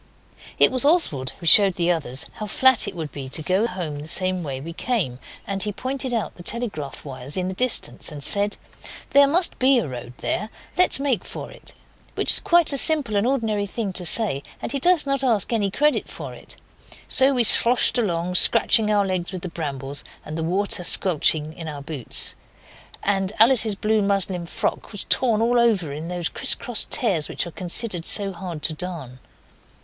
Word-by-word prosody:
It - - +5
was 255 0 0
Oswald 280 - +1
who 170 - -11
showed 195 +2 +6
the 175 0 0
others 140 -6 -2
how 215 - -6
flat 260 +1 +2
it 200 - -7
would 160 -3 -7
be 135 -2 -9
to 155 - -3
go 190 +7 0
home 170 -8 -6
the 150 - -10
same 185 +2 0
way 140 -5 -6
we 165 +5 -9
came; 180 - -3 0.3
and 195 -1 -4
he 210 +1 -2
pointed 260 +4 -5
out 230 -3 -3
the - - -14
telegraph 175 - -4
wires 135 +3 -5
in 185 0 -3
the - - -5
distance 245 -4 -1
and 145 -2 -9
said 205 +5 +1 0.5
'There 280 0 +5
must 335 +5 +1
be 260 +1 +3
a 210 - -2
road 125 -2 -9
there, 215 +3 -3 0.3
let's 365 -5 +4
make 270 -9 -2
for - - -9
it,' - - -14 0.4
which - - +2
was - - +6
quite 340 -4 +3
a 275 - +5
simple 290 -9 +4
and 205 +3 0
ordinary 220 -6 -2
thing 200 -2 -5
to 180 - -1
say, 175 -5 +2 0.2
and - - -6
he 280 - -2
does 345 +1 +2
not 275 -1 -2
ask 225 -7 0
for - - -4
any 205 -3 -1
credit 295 +9 -1
for - - -9
it. - - -6 0.5
So 265 +1 +3
we 245 - +1
sloshed 240 +3 +6
along, 180 -5 -3
scratching 220 +2 +4
our 205 -1 +1
legs 185 -2 -4
with 185 -2 -8
the 180 - -5
brambles, 140 -4 -5 0.2
and 155 - -8
the 165 - -4
water 185 +2 0
squelched 175 -3 +4
in 155 +2 -8
our 145 -2 -8
boots, 140 -5 0 0.7
and 195 0 -1
Alice's 225 -2 +4
blue 215 +2 -1
muslin 195 -3 -1
frock - - -5
was 205 - -7
torn 225 -4 +1
all 240 +1 +1
over 200 -11 0
in 155 +3 -8
those 175 -1 -3
crisscross 245 -3 +1
tears 190 -11 +2
which - - -2
are 170 - -9
considered 180 0 0
so 200 -2 +3
hard 175 -4 -9
to 160 - +1
darn. 155 -7 -8
195 Hz, 200 wpm, -21 LUFS, 165-235 Hz, 0.7 s, showed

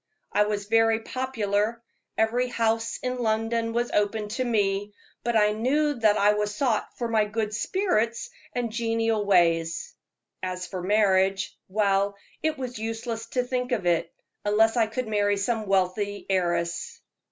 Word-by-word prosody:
I 210 - +3
was 205 -1 -2
very 225 +1 +3
popular 225 -3 -1 0.3
every 235 +3 +2
house 230 -1 0
in 250 0 -2
London 225 0 0
was 240 +1 -1
open 210 +1 0
to 255 +4 -1
me 205 -3 0 0.3
but 235 0 0
I 210 -1 +4
knew 280 +8 +1
that 220 -5 +3
I 205 +1 +4
was 210 0 -1
sought 235 -3 -1
for 240 - -2
my 220 -2 +2
good 215 0 -2
spirits 235 - 0 0.2
and 240 -2 -1
genial 225 -1 0
ways. 170 - +2 0.5
As 185 0 -3
for 185 -1 -5
marriage 195 -1 +2
well, 200 0 +1 0.3
it 315 -1 0
was 250 -3 -5
useless 225 +1 -4
to 250 +1 0
think 250 0 -2
of 215 -7 0
it, 170 -1 +1 0.3
unless 220 +2 +3
I 230 -2 +3
could 235 +2 -3
marry 205 -1 +1
some 215 +1 -1
wealthy 195 +2 0
heiress." 175 - -1
220 Hz, 150 wpm, -26 LUFS, 205-235 Hz, 0.5 s, I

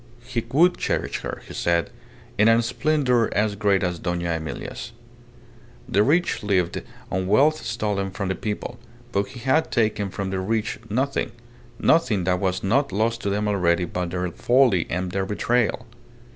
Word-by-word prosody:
He 125 -3 -2
would 170 +6 +4
cherish - - -1
her, - - -6
he - - -9
said, 85 -1 0 0.4
in 105 - +4
a 115 +1 +5
splendour 125 -1 +1
as 105 0 +2
great 100 -2 +2
as 90 -2 -1
Dona 85 -1 -2
Emilia's. 80 -1 -6 0.9
The 100 - +3
rich 165 +10 +2
lived 95 -4 0 0.3
on 95 0 -1
wealth 145 +10 +3
stolen 105 -4 -1
from 95 0 -4
the - - +1
people, 110 +4 -5 0.3
but 100 -2 0
he 125 0 -10
had 135 +6 +2
taken 110 -3 +1
from 95 0 -4
the 95 - -1
rich 110 +3 -1
nothing 130 +6 0 0.5
nothing 115 - +3
that 90 +1 +1
was 95 -1 -1
not 130 +8 +2
lost 115 +4 0
to 100 - -1
them 105 +1 0
already 90 -3 +2
by 90 +1 -3
their 90 +1 -3
folly 120 -5 +3
and 90 +1 -2
their 95 +1 -1
betrayal. 115 +3 0
105 Hz, 165 wpm, -24 LUFS, 95-120 Hz, 0.9 s, a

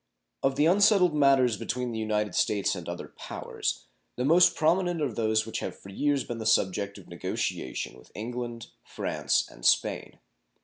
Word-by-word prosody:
Of 135 0 +1
the 145 +2 +3
unsettled 185 -1 +5
matters 135 -6 +4
between 125 -1 -3
the 110 - -4
United 105 -1 -1
States 100 -2 +1
and 90 -3 -6
other 85 0 -6
powers, - - -4 0.3
the 125 - -2
most 175 +3 +5
prominent 175 +2 +1
are 145 -6 -1
those 110 0 +1
which 110 - -4
have - - -5
for 100 - -13
years 145 +7 0
been 120 -1 -6
the 110 - -5
subject 100 -1 +1
of 95 - -14
negotiation 75 -6 -4
with 65 - -19
England, 120 +1 -5
France, - - -1
and - - -16
Spain. - - +1
120 Hz, 170 wpm, -28 LUFS, 105-150 Hz, 0.3 s, unsettled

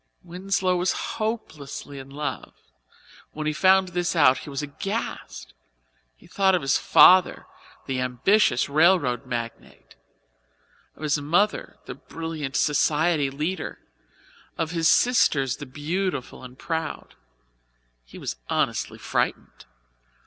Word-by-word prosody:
Winslow 185 +1 -1
was 180 +1 +1 0.3
hopelessly 150 -10 -5
in 135 0 -11
love, 145 +2 -5 0.8
when 155 0 -5
he 155 - 0
found 190 +3 +4
this 175 0 -2
out 135 -5 +5
he - - -10
was 140 +1 -4
aghast. 195 - -5 0.6
He - - -21
thought 190 -1 +2
of 175 - -2
his 135 - +2
father, 185 0 +5 0.4
the 130 -1 -2
ambitious 125 - +2
railroad 145 -5 +2
magnate; 120 -2 -7 1.0
of - - -12
his 150 -1 0
mother, 175 +9 0
the - - -6
brilliant 160 -4 -6
society 150 0 +2
leader; 155 +5 -4 0.8
of 165 -1 -2
his 165 -1 +2
sisters, 145 - +3
the 145 - -9
beautiful 150 0 -4
and 125 0 -11
proud; 160 -1 -4 0.9
he - - -14
was - - -5
honestly - - -1
frightened. - - -3
155 Hz, 120 wpm, -24 LUFS, 135-185 Hz, 1.0 s, out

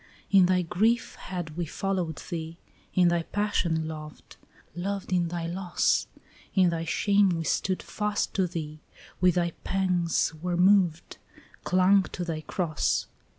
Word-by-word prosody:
In 190 -3 +6
thy 185 0 +2
grief 220 +8 +1
had 175 -4 -6
we 175 -1 -2
followed 185 -3 -2 0.2
thee, 165 -1 -5 0.4
in 180 -2 +5
thy 170 0 +1
passion 170 -4 -1
loved, 155 -1 -9 0.4
Loved 190 +1 -3
in 175 -1 +2
thy 170 0 -4
loss; 175 +1 0 0.5
In 185 -3 +4
thy 165 0 -2
shame 200 +4 +3
we 165 -2 -1
stood 185 +4 -1
fast 210 -1 -2
to 190 -2 +1
thee, 155 -3 -6 0.4
with 180 -2 +4
thy 170 -1 +1
pangs 180 -4 +1
were 175 0 -1
moved, 180 -3 +3 0.5
Clung 185 +2 +4
to 175 - -3
thy 160 -2 -3
cross. 155 -1 -1
175 Hz, 145 wpm, -27 LUFS, 165-190 Hz, 0.5 s, In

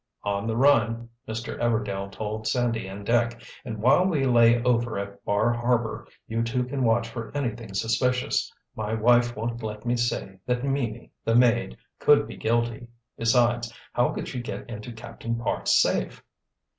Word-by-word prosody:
"On 100 +1 -1
the 115 0 -1
run," 120 -4 +3 0.2
Mr. 115 +1 -5
Everdail 105 -4 -1
told 110 +1 -4
Sandy 115 -3 0
and 100 +1 -8
Dick, 120 +1 +1 0.2
"and 115 -4 -5
while 130 +11 +4
we 160 -8 +1
lay 120 -1 +5
over 120 -2 +1
at 100 0 -6
Bar 105 +4 +2
Harbor, 120 -1 -1 0.2
you 115 +1 -1
two 115 +2 0
can 130 +1 -2
watch 115 0 +2
for 115 -1 -7
anything 115 -6 -4
suspicious. 120 +4 0 0.2
My 110 0 -2
wife 120 +2 +3
won't 115 +2 -3
let 105 0 -6
me 120 0 +1
say 115 -5 -2
that 125 0 0
Mimi, 130 -5 -2
the 115 - +1
maid, 120 - +3 0.2
could 145 -1 +5
be - - -8
guilty—besides, 120 +1 0 0.2
how 120 - +3
could - - -4
she 125 - -4
get 120 - -6
into 115 +1 -7
Captain 115 +1 -5
Parks' 115 0 +1
safe?" 60 - 0
115 Hz, 160 wpm, -26 LUFS, 110-120 Hz, 0.2 s, lay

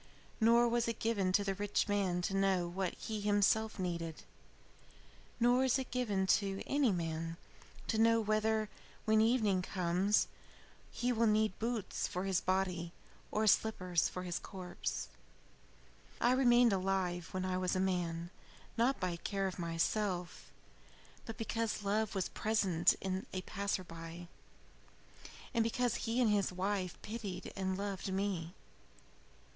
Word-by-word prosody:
Nor 235 +1 +5
was 235 0 +1
it 230 -1 -2
given 205 -5 +1
to 205 - +4
the 195 -1 0
rich 205 +2 0
man 190 -4 0
to 195 - -1
know 190 -3 +2
what 180 +1 -2
he 215 -2 -4
himself 210 +2 +2
needed. 170 -4 -3 1.2
Nor 245 +2 +4
is 260 0 +3
it 265 -1 -5
given 210 -7 0 0.2
to 195 -1 -3
any 280 -5 +2
man 165 -2 -3 0.5
to 220 - 0
know 230 0 +5
whether, 215 0 +1 0.4
when 220 -1 +4
evening 220 -5 +3
comes, 180 +3 +1 0.6
he 245 +1 -1
will 230 0 +3
need 215 -2 +2
boots 230 -2 -2
for 180 - -3
his 190 -2 +1
body 180 -2 -1 0.4
or 215 +1 0
slippers 185 -5 +2
for 180 - -5
his 175 -1 -3
corpse. 180 -3 -5 1.1
"I 240 - +4
remained 245 -3 +5
alive 185 -2 0
when 185 0 -3
I 185 0 -1
was 185 +1 0
a - - +1
man, 175 -2 -1 0.5
not 245 +2 +2
by 180 -2 -1
care 195 +2 -2
of 190 -1 -3
myself, 175 +2 -1 0.8
but 225 - -6
because 225 -2 -2
love 210 +1 0
was 190 -2 0
present 195 -6 +2
in 190 0 -3
a 185 -1 -3
passer 200 -1 -2
by, 165 0 -9 1.2
and 230 -2 +3
because 240 +1 0 0.2
he 235 +2 +1
and 235 -4 +4
his 200 -2 +2
wife 185 -1 -2
pitied 205 -5 -5
and 190 -1 -1
loved 195 -1 -3
me. 190 -3 -2
195 Hz, 145 wpm, -34 LUFS, 180-220 Hz, 1.2 s, Nor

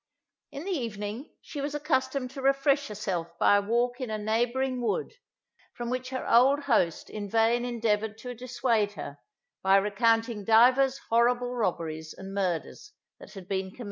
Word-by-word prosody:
In 280 - -7
the 395 - -3
evening 230 - -4
she 290 - -7
was 285 +1 -3
accustomed 260 -3 -1
to 270 - -7
refresh 275 +1 +2
herself 180 -6 -4
by 205 - +5
a - - +2
walk 240 +4 0
in 255 - -3
a 215 - -2
neighbouring 240 +4 0
wood, 440 - -1 0.6
from 240 0 -4
which 255 0 -3
her 260 -1 -4
old 265 +5 +5
host 220 - +1
in 205 -1 -6
vain 230 +3 +2
endeavoured 220 -3 -1
to 250 +2 -7
dissuade 240 -3 0
her, 145 -7 -8 0.4
by 190 0 +4
recounting 225 +2 +1
divers 255 +5 +5
horrible 245 +1 +2
robberies 160 -8 -3
and 190 +1 -8
murders 195 - -3 0.3
that - - -13
had 190 -2 -10
been 190 -1 -2
committed - - -18
there. - - -22
235 Hz, 170 wpm, -28 LUFS, 205-260 Hz, 0.6 s, by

